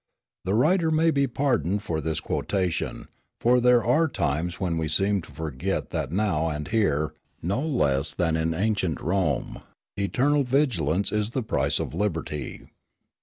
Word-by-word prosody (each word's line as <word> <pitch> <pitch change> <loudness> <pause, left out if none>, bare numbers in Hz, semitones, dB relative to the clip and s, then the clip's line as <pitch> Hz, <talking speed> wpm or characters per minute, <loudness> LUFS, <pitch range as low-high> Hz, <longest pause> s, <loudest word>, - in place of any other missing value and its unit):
The 95 +3 +1
writer 165 - +3
may 160 +1 +3
be 140 -2 +2
pardoned 120 -7 0
for 80 -6 -2
this 80 0 -2
quotation; 90 +4 -2 0.3
for 125 +1 +4
there 125 -1 +5
are 150 +8 +3
times 85 - -2
when 85 -4 -1
we 80 - -1
seem 95 +5 +1
to 80 - -14
forget 75 -3 -3
that - - -2
now 90 -5 +1
and 75 -1 -4
here, 80 -10 +1 0.3
no 100 +10 0
less 75 - +1
than 80 -2 +1
in 80 0 0
ancient 95 -5 0
Rome, 85 -5 -1 0.3
"eternal 135 +9 +2
vigilance 105 - +1
is 105 0 0
the 125 +1 -2
price - - 0
of - - -4
liberty." 80 -7 -3
95 Hz, 155 wpm, -26 LUFS, 80-120 Hz, 0.3 s, there